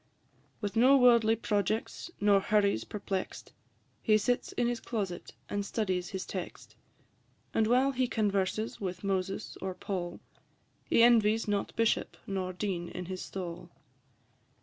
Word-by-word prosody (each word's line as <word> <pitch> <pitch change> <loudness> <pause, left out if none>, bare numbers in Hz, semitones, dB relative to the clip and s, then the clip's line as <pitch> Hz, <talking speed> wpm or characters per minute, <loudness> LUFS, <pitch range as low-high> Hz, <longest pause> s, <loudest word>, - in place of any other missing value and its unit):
With 205 0 -3
no 255 +5 +6
worldly 235 -3 +5
projects 215 +6 -1
nor 205 -1 +5
hurries 200 - +2
perplex'd, 195 -2 -5 0.5
He 215 -1 +4
sits 245 +4 0
in 245 - 0
his 240 0 0
closet 195 -8 -4
and 205 0 -2
studies 185 -4 -2
his 190 -1 -4
text; 185 -3 -7 0.8
And 220 -1 +2
while 255 +4 +4
he 255 -1 0
converses 210 -1 -1
with 185 -1 -4
Moses 195 +1 -2
or 190 -1 -3
Paul, 180 -3 -4 0.7
He 230 - +4
envies 225 -2 +4
not 205 -1 -1
bishop, 230 -1 +1
nor 190 -2 -2
dean 180 -2 -3
in 180 0 -6
his 185 +1 -5
stall. 175 -2 -6
205 Hz, 135 wpm, -30 LUFS, 185-225 Hz, 0.8 s, no